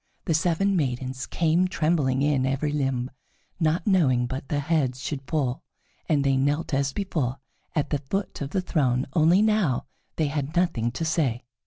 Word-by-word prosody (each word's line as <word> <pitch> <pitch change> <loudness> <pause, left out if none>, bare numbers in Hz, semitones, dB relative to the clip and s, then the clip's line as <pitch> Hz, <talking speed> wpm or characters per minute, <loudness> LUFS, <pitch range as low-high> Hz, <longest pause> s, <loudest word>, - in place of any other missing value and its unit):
The 165 - +1
seven 175 +5 +2
maidens 130 -3 -2
came 170 +2 +2
trembling 155 -7 +1
in 145 -3 +2
every 135 +3 0
limb, 135 -3 -1 0.5
not 160 0 +1
knowing 140 - +3
but 130 +2 -5
their 145 - 0
heads 140 -4 0
should 135 +1 -4
fall, 135 -6 -1 0.5
and 145 -3 +3
they 135 -1 +2
knelt 145 +4 0
as 135 0 +1
before 145 -9 -2 0.4
at 150 -2 0
the 145 - +1
foot 195 +9 -4
of 140 - -3
the 185 - 0
throne, 130 -8 +1
only 170 +5 +5
now 210 - +2 0.3
they 160 - +1
had 145 +2 -3
nothing 130 -10 +1
to 160 +6 -2
say. 140 -7 0
145 Hz, 170 wpm, -25 LUFS, 130-165 Hz, 0.5 s, only